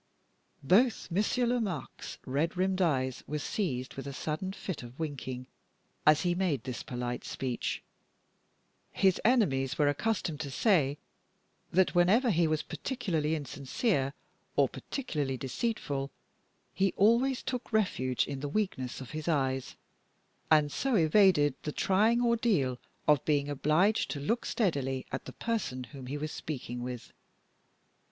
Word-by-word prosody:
Both 215 - +3
Monsieur 215 +7 +1
Lomaque's 225 - -2
red 150 +7 -1
rimmed 190 +1 +1
eyes 130 -7 +1
were 150 - -2
seized 140 - -2
with 135 0 -7
a 140 - -5
sudden 155 +7 -3
fit 190 -4 -5
of 120 +3 -11
winking, 130 -5 -4 0.6
as 150 0 +7
he 175 -1 +1
made 175 -9 0
this 125 -5 -4
polite 125 -1 -4
speech. 125 -3 -3 1.1
His 190 -2 +2
enemies 135 - +2
were 150 - +3
accustomed 160 0 0
to 140 - -4
say 145 - +2 0.7
that, 185 +1 +3
whenever 205 +8 +4
he 170 -2 +3
was 155 -1 0
particularly 165 - -1
insincere, 140 - -1 0.4
or - - +4
particularly 150 - -3
deceitful, 140 - -2 0.6
he 190 +3 +1
always 235 +6 +3
took 250 -2 -4
refuge 130 - +1
in 140 -1 -5
the 145 +1 -3
weakness 140 -10 -2
of 130 - -8
his 155 +1 -5
eyes, 135 -5 0 0.7
and 150 -2 +5
so 270 - 0
evaded 160 -4 +5
the 150 - -3
trying 220 +9 +3
ordeal 210 - +2 0.3
of 150 -3 +5
being 145 -2 +1
obliged 155 +9 +2
to 145 - -3
look 230 - -1
steadily 135 - 0
at - - -4
the - - -8
person 210 - -2
whom 125 +2 -10
he 145 +3 -3
was 155 +1 -4
speaking 125 -5 -5
with. 125 -1 -6
155 Hz, 140 wpm, -30 LUFS, 135-200 Hz, 1.1 s, as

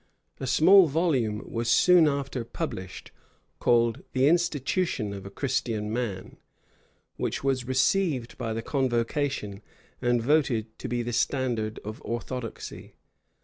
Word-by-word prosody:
A 135 - -4
small 180 +7 +6
volume 135 -9 0
was 115 0 -2
soon 175 +5 +6
after 140 -3 -2
published, 95 -4 -6 0.5
called 115 -1 +2
the 130 +1 +3
Institution 160 - 0
of 100 -1 -8
a - - -7
Christian 115 -4 -2
Man, 110 -6 -4 0.8
which - - -3
was 130 -3 0
received 130 -1 +1
by 115 - -4
the 115 0 -4
convocation, 130 -5 -1 0.4
and 120 0 +2
voted 115 -4 +1
to - - -5
be 120 0 -1
the 120 +1 -4
standard 120 -3 -1
of 110 +1 -7
orthodoxy. 120 0 -6
125 Hz, 125 wpm, -27 LUFS, 115-140 Hz, 0.8 s, small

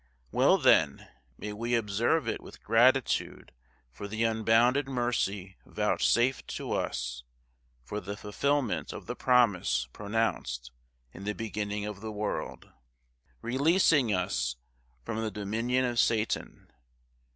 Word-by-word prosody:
Well, - - +4
then, - - +3 0.3
may 105 - -6
we 120 +3 -1
observe 115 +8 +1
it - - -2
with - - -13
gratitude 125 +4 +2 0.4
for 100 +11 -7
the 110 +2 -2
unbounded 115 +5 +3
mercy 105 -7 -2
vouchsafed 125 +2 +1
to - - -5
us; - - -2 0.6
for 105 +11 -5
the 100 +2 -6
fulfilment 130 +4 -1
of - - -8
the - - -5
promise 100 - +2
pronounced 100 - -2 0.4
in 95 - -10
the 105 0 -2
beginning 105 -2 -3
of 105 -1 -6
the 110 0 -5
world, 105 0 -4 0.7
releasing 140 - +3
us 90 -11 -1 0.5
from 110 - -3
the 110 - -1
dominion 115 +5 -1
of 120 -1 -1
Satan. 110 -2 0
110 Hz, 120 wpm, -29 LUFS, 100-120 Hz, 0.7 s, Well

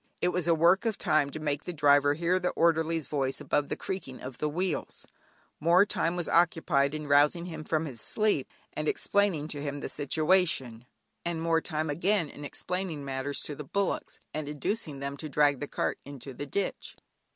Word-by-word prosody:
It 180 - +2
was 180 -2 -1
a 170 - +5
work 175 +7 +4
of 220 - -1
time 150 -2 +2
to 155 - -6
make 145 -1 -2
the 180 - -3
driver 145 -2 +4
hear 175 +3 +1
the 180 -1 0
orderly's 165 -1 +2
voice, 135 -3 -1
above 145 -1 0
the - - -1
creaking 185 -9 -5
of 130 -1 -8
the 150 - 0
wheels; 175 +1 -3 0.5
more 175 +5 +5
time 170 -4 0
was 175 -1 -2
occupied 160 -4 +2
in 150 0 -5
rousing 145 +4 +4
him 165 -3 -6
from 155 +1 0
his 125 -7 -6
sleep, 210 -11 +1 0.2
and 155 - -3
explaining 195 -7 +1
to 145 -2 -4
him 145 0 -3
the - - -4
situation; 155 -6 +1 0.4
and 170 -1 -2
more 165 0 +2
time 155 -1 -2
again 175 +1 +1
in 145 - -10
explaining 165 0 -3
matters 135 +1 -2
to 150 - -4
the 150 - -7
bullocks, 200 +8 -2
and 150 -1 -3
inducing 150 -1 -3
them 140 0 -4
to 155 +1 -6
drag 145 -1 +3
the 145 - -4
cart - - -2
into 140 -1 -9
the 145 +3 -6
ditch. 200 +8 -3
155 Hz, 195 wpm, -29 LUFS, 145-175 Hz, 0.5 s, a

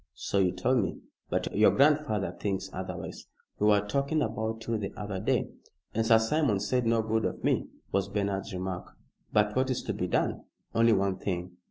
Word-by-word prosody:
"So 100 0 -1
you 90 -2 +3
told 110 +8 +1
me. 100 - -2 0.3
But - - -1
your 105 +1 +6
grandfather 140 - +3
thinks 100 -2 -2
otherwise. - - -6 0.3
We 105 - +3
were 105 -1 +4
talking 140 +7 +1
about 110 0 -3
you 115 -1 -1
the 100 -2 -3
other 100 -2 -4
day." - - 0 0.4
"And 115 - +1
Sir 115 - +7
Simon 110 -1 +2
said 120 +4 0
no 115 -1 +3
good 110 0 0
of - - -3
me," - - +1 0.2
was 100 0 0
Bernard's 100 0 -2
remark. 90 -1 -5 0.4
"But 105 0 +2
what 130 +1 +2
is 130 - -1
to - - -2
be - - -2
done?" - - 0 0.3
"Only 115 0 +5
one 95 -2 +1
thing. 90 -2 -3
105 Hz, 190 wpm, -29 LUFS, 95-115 Hz, 0.4 s, Sir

